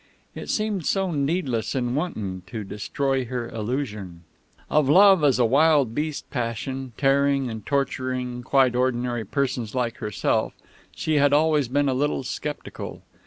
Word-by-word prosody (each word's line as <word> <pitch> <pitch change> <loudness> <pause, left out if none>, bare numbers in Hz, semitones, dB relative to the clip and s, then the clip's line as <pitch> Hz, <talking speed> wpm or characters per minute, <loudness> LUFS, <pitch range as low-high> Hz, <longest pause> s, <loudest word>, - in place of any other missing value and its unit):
It - - -8
seemed 210 -6 -1
so 195 -2 +1
needless 140 - -1
and 125 -1 -1
wanton 105 - -3
to 110 +3 -5
destroy 130 +7 -2
her 120 -1 -4
illusion. 105 -7 -4 0.4
Of 150 -3 +2
love 190 +1 +7
as 140 -4 +4
a 125 - +4
wild 140 -1 +4
beast 150 +2 -3
passion, 125 +1 -3
tearing 140 -2 +2
and 110 -1 -7
torturing 130 -2 -2
quite 130 0 +3
ordinary 125 -2 0
persons 125 -2 -2
like 120 -2 -1
herself, 105 -1 -1 0.4
she 155 -1 0
had 145 0 +4
always 150 -2 +3
been 145 +3 +1
a 135 - +2
little 140 +1 0
sceptical. 145 +3 -6
130 Hz, 145 wpm, -24 LUFS, 120-145 Hz, 0.4 s, love